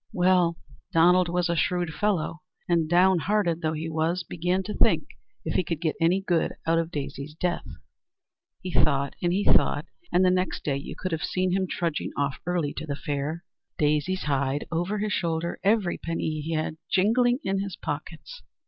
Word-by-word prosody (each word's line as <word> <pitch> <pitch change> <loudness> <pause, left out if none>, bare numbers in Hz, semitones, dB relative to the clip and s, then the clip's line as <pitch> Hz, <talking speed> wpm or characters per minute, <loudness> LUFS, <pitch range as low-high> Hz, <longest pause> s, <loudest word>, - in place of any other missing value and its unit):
Well, 180 -2 +3 0.3
Donald 175 +2 +5
was 175 0 +1
a 170 - 0
shrewd 175 0 0
fellow, 170 -3 -1 0.3
and 165 -3 +2
down 180 +1 +5
hearted 175 -3 +1
though 155 0 0
he 160 +1 -3
was, 165 +3 0
began 180 +3 -1
to 210 +2 -4
think - - +3 0.4
if - - -1
he - - +2
could 165 -2 -3
get 160 -2 -1
any 175 +4 +3
good 175 -4 +1
out 165 0 +3
of 165 -1 -1
Daisy's 145 -1 -5
death. 175 +1 -2 1.0
He 185 - -4
thought 140 -4 +2
and 175 - +1
he 195 +3 +1
thought, - - +3 0.3
and 185 +1 +4
the 180 - +5
next 185 0 -1
day 140 -2 0
you 140 - -7
could 185 - -3
have 160 -1 -1
seen 185 0 0
him 190 0 +1
trudging 170 -3 -1
off 140 -1 -1
early 175 -5 0
to 155 - -5
the 140 - -2
fair, 145 +4 -3 0.3
Daisy's 150 +5 +1
hide 140 0 0
over 175 +5 -1
his 210 0 -1
shoulder, 170 0 -1
every 200 -3 +2
penny 160 -2 -2
he 165 +2 -3
had 155 0 -2
jingling 240 +5 +3
in 195 0 0
his 195 -2 -4
pockets. 155 +2 -6
170 Hz, 185 wpm, -26 LUFS, 155-185 Hz, 1.0 s, Donald